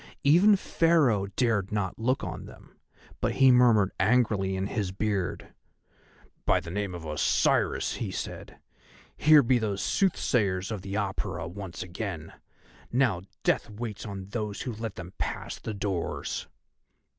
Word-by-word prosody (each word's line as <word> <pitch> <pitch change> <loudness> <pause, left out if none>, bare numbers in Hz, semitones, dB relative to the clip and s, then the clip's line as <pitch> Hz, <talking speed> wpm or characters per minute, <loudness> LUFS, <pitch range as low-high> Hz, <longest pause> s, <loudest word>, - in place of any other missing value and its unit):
Even 180 +9 +6
Pharaoh 155 - +2
dared 105 -3 0
not 105 -2 -2
look 130 +4 0
on - - -5
them, - - -14 0.5
but - - 0
he 135 -1 +6
murmured 115 -6 +5
angrily 105 -5 +2
in 95 0 -1
his 100 -3 -2
beard: 100 -2 -2 0.9
"By - - +3
the 80 - -8
name 100 -1 -3
of 85 -2 -8
Osiris," 75 -1 +1
he - - -3
said, - - -6 0.6
"here 150 -1 +6
be 125 +1 +3
those 105 -3 -2
Soothsayers 105 - +1
of 105 -4 -4
the 100 +1 -5
Apura 100 -2 -2
once 95 -1 -7
again. 90 -3 -6 0.6
Now 120 -8 +2 0.2
Death - - +1
waits 105 0 -6
on 100 -2 -7
those 105 -2 -3
who 125 - -4
let 110 -1 -5
them 90 0 -8
pass - - -4
the 110 - -5
doors." 95 -4 -3
105 Hz, 145 wpm, -28 LUFS, 95-120 Hz, 0.9 s, Even